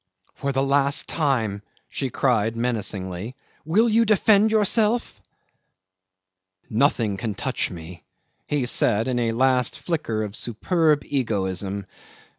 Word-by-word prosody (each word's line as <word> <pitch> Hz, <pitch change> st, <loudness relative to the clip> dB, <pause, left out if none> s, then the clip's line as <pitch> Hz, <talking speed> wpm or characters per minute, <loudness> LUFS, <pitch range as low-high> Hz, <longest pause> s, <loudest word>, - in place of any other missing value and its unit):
"For 140 Hz, -, -3 dB
the 135 Hz, 0 st, 0 dB
last 140 Hz, 0 st, +2 dB
time," 115 Hz, -10 st, 0 dB, 0.3 s
she 135 Hz, -, -3 dB
cried 115 Hz, -3 st, 0 dB
menacingly, 105 Hz, -2 st, -3 dB, 0.3 s
"will 205 Hz, +9 st, +3 dB
you 230 Hz, +1 st, +4 dB
defend 215 Hz, 0 st, +4 dB
yourself?" 220 Hz, +2 st, +1 dB, 1.5 s
"Nothing 115 Hz, -4 st, +1 dB
can 110 Hz, -2 st, -4 dB
touch -, -, -2 dB
me," 85 Hz, 0 st, -10 dB, 0.4 s
he 145 Hz, -4 st, 0 dB
said 115 Hz, -2 st, +1 dB
in 125 Hz, -1 st, 0 dB
a 115 Hz, -1 st, 0 dB
last 125 Hz, +1 st, +1 dB
flicker 130 Hz, -11 st, -2 dB
of 105 Hz, -1 st, -6 dB
superb 150 Hz, -, +1 dB
egoism. 100 Hz, -6 st, -2 dB
125 Hz, 115 wpm, -23 LUFS, 105-150 Hz, 1.5 s, you